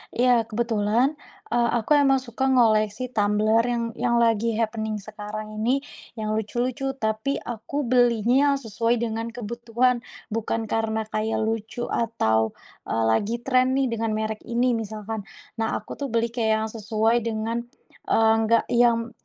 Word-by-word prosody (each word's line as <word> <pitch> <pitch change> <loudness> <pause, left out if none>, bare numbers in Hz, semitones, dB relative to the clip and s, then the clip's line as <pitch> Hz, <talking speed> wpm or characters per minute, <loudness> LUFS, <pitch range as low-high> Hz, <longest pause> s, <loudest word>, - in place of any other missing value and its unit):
Iya, 240 -2 +3
kebetulan, 230 +5 +1 0.3
eee, 235 0 +2
aku 230 +5 -5
emang 270 -2 +4
suka 260 +2 -2
ngoleksi 230 -1 +2
tumbler 215 0 +2
yang 240 -1 0 0.2
yang 240 -1 +2
lagi 230 0 +2
happening 220 -1 -1
sekarang 215 0 -7
ini, 255 +5 +1 0.3
yang 215 -2 -3
lucu-lucu, 245 +5 -2
tapi 220 +3 -1
aku 240 +5 -4
belinya 245 +3 +3
sesuai 230 -2 0
dengan 225 0 -2
kebutuhan 235 +2 0 0.3
bukan 225 +1 -1
karena 220 0 0
kayak 220 +1 -1
lucu 225 +2 -3
atau, 110 - +1 0.3
eee, 115 0 0
lagi 205 - +1
tren 255 -1 +3
nih 270 -3 +1
dengan 225 -1 -1
merek 220 0 -2
ini 240 +2 +2
misalkan, 220 -1 -4 0.3
nah 225 0 0
aku 215 - -6
tuh 280 - -2
beli 230 -1 0
kayak 230 -2 0
yang 220 - -5
sesuai 220 +1 +1
dengan, 225 +1 -2 0.5
eee, 225 0 +4
enggak 225 +1 +3
yang, 235 -1 +3
230 Hz, 145 wpm, -24 LUFS, 220-240 Hz, 0.5 s, emang